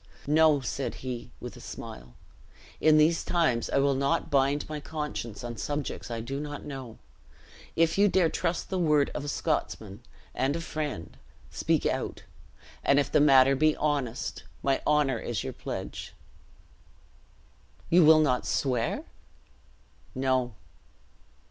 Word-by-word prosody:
"No," 150 -1 +4
said 135 +1 -3
he, 125 -2 -5
with - - -8
a - - -11
smile; 60 0 -9 0.6
"in 155 -1 +5
these 160 +2 +4
times 160 -10 +1
I - - +1
will 140 0 +3
not 140 +5 0
bind 140 +1 +2
my 155 -1 -4
conscience 150 -8 -5
on 120 -1 -5
subjects 145 -1 -4
I 115 -1 -3
do 135 +4 -4
not 145 -1 -6
know. 135 -5 -7 0.8
If 165 +3 +2
you 205 - +6
dare 185 -3 +3
trust 170 +3 -2
the 190 - 0
word 150 -4 +3
of - - -4
a - - -6
Scotsman 115 - -2 0.3
and 135 +4 0
a - - -2
friend, 150 - -5 0.3
speak - - 0
out; - - -2 0.6
and 140 - +4
if 145 - -1
the - - +4
matter 135 -2 +6
be 155 +2 +3
honest, 140 -5 -2 0.2
my 135 -1 +1
honor 145 -5 +2
is 115 -3 -3
your - - -5
pledge." - - -6 1.8
"You 175 +1 +7
will 155 0 +7
not 130 -5 +1
swear?" 125 -4 0 1.1
"No." 130 -3 0
140 Hz, 140 wpm, -28 LUFS, 130-155 Hz, 1.8 s, You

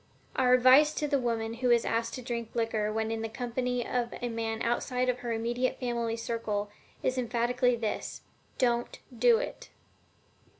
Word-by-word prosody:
Our 250 -1 +5
advice 260 +5 +6
to 300 - -1
the 280 -1 +2
woman 230 -2 -1
who 250 - +2
is 235 -1 +4
asked 230 0 -1
to 255 - -7
drink 235 -1 -4
liquor 225 -2 0
when 220 +1 -1
in 225 0 -2
the 225 - -3
company 245 +1 -2
of 240 -1 -1
a 245 - -2
man 225 -1 -3
outside 250 +2 0
of 250 0 0
her 240 -1 -4
immediate 240 +3 -1
family 235 -2 -1
circle 215 -3 -2 0.3
is 255 0 +1
emphatically 245 +1 +1
this: 225 -2 -4 0.4
DON'T 240 -2 +1 0.2
DO 480 -2 +5
IT! - - -5
240 Hz, 170 wpm, -29 LUFS, 230-250 Hz, 0.4 s, advice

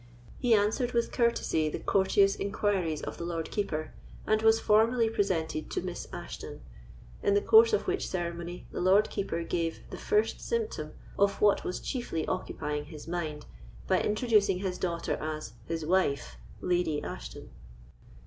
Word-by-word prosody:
He 245 -3 +4
answered 220 +4 +1
with 235 -1 +1
courtesy 235 -10 +1
the - - -3
courteous 195 0 +3
inquiries 195 -6 -1
of - - -5
the - - -4
Lord 170 -1 -3
Keeper, 155 -7 -2 0.3
and 215 0 +2
was 225 0 +5
formally 225 +2 +3
presented 165 -7 -1
to - - -2
Miss 180 -1 -5
Ashton, - - -7 0.6
in 200 - +2
the 205 - +4
course 450 - +7
of 430 - +1
which 380 +1 -1
ceremony 170 -1 -4
the - - -4
Lord 195 +4 +4
Keeper 170 -4 -2
gave 165 -1 -2
the - - -7
first 425 0 +1
symptom 465 -1 -2 0.3
of 200 0 +3
what 205 -1 +4
was 180 - -3
chiefly 240 - -3
occupying 150 -4 -3
his 150 0 -10
mind, 160 -3 -3 0.4
by - - +2
introducing 210 -3 +2
his 185 -1 -3
daughter 170 -2 -1
as 155 -7 -5
"his 165 -1 -3
wife, 140 - +1 0.2
Lady 175 -4 0
Ashton." - - -8
185 Hz, 155 wpm, -29 LUFS, 165-215 Hz, 0.6 s, course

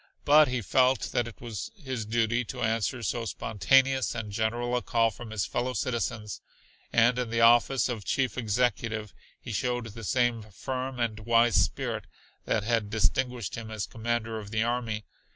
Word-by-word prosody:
But 150 +1 +7
he 125 -2 -2
felt 130 +5 +2
that 120 - 0
it 115 - -11
was 115 -4 -5
his 130 - -5
duty 115 +2 +1
to - - -5
answer 115 +2 0
so 115 +2 -1
spontaneous 130 +5 +2
and 105 -2 -4
general 120 +4 -1
a 125 - +1
call 115 -1 +2
from 120 +2 -10
his 110 -3 -1
fellow 125 +1 -2
citizens, 115 -3 -2 0.5
and 120 +1 +4
in 125 -2 -2
the 115 0 0
office 120 +2 +5
of 115 -5 -4
chief 130 +2 0
executive 110 -2 -1 0.3
he - - -8
showed 120 +2 -1
the 115 +1 -9
same 120 +1 +1
firm 130 +5 -5
and 115 -2 -1
wise 115 +1 +4
spirit - - -3 0.4
that 110 - 0
had 110 -2 0
distinguished 115 +2 0
him 115 -1 -6
as 110 -2 -3
commander 115 0 -2
of 105 -2 -9
the 110 +1 +1
army. 115 -2 -2
115 Hz, 170 wpm, -28 LUFS, 110-125 Hz, 0.5 s, But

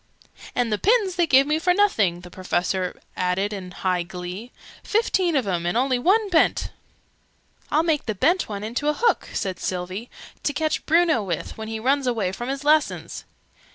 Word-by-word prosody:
"And 240 -3 +1
the 210 - -1
pins 415 -4 +2
they 345 -2 +2
gave 270 -1 +6
me 305 +2 +1
for 360 +2 +2
nothing!" 210 - +2
the 180 0 -12
Professor 185 0 -2 0.2
added 185 +3 0
in 190 -3 -6
high 180 0 -1
glee. 180 +6 -7 0.3
"Fifteen 380 -6 +1
of 265 -5 +2
'em, 175 -2 -1
and 175 - 0
only 255 0 +2
one 410 - +3
bent!" 325 - +2 1.0
"I'll 310 +2 +2
make 315 -6 0
the 215 - -1
bent 345 - +2
one 205 -1 -5
into 240 +7 -1
a - - +2
hook!" 470 0 +1
said 190 -2 -3
Sylvie. 185 +5 -4 0.3
"To 290 - -1
catch 310 0 -1
Bruno 325 -6 +4
with, 175 -6 -4
when 220 0 -7
he 220 0 -4
runs 270 +3 +1
away 220 -7 0
from 240 +6 -5
his 275 +1 -3
lessons!" 305 +1 +1
240 Hz, 185 wpm, -23 LUFS, 185-315 Hz, 1.0 s, gave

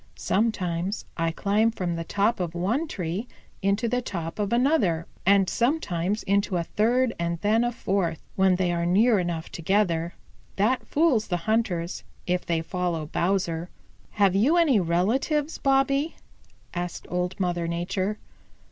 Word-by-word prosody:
Sometimes 190 -3 -1
I 165 -1 0
climb 205 +6 +2
from 180 -6 -3
the 165 - -3
top 205 +6 +1
of 175 -2 -3
one 225 - 0
tree 185 - -4 0.3
into 200 +4 +1
the 250 +2 0
top 170 -5 -5
of 205 -1 -1
another, 235 - +2 0.2
and 195 -1 +5
sometimes 210 - 0
into 200 -1 +1
a 170 - 0
third 235 +6 +1
and 170 0 -1
then 220 +3 +3
a 240 - 0
fourth, 190 -8 -1 0.2
when 190 -1 +4
they 180 -1 +1
are 170 0 -1
near 210 +4 +4
enough 170 -2 -3
together. 170 -2 0 0.4
That 225 +6 +1
fools 290 -8 +2
the 175 - 0
hunters, 190 -6 0 0.2
if 180 0 0
they 165 -1 0
follow 175 -3 -2
Bowser." 170 0 -1 0.4
"Have 200 -3 +3
you 265 - +4
any 300 -10 +4
relatives, 235 - 0
Bobby?" 275 +3 +2 0.6
asked 175 0 -4
Old 180 +1 -2
Mother 175 -2 0
Nature. 185 +4 -2
195 Hz, 145 wpm, -26 LUFS, 175-225 Hz, 0.6 s, and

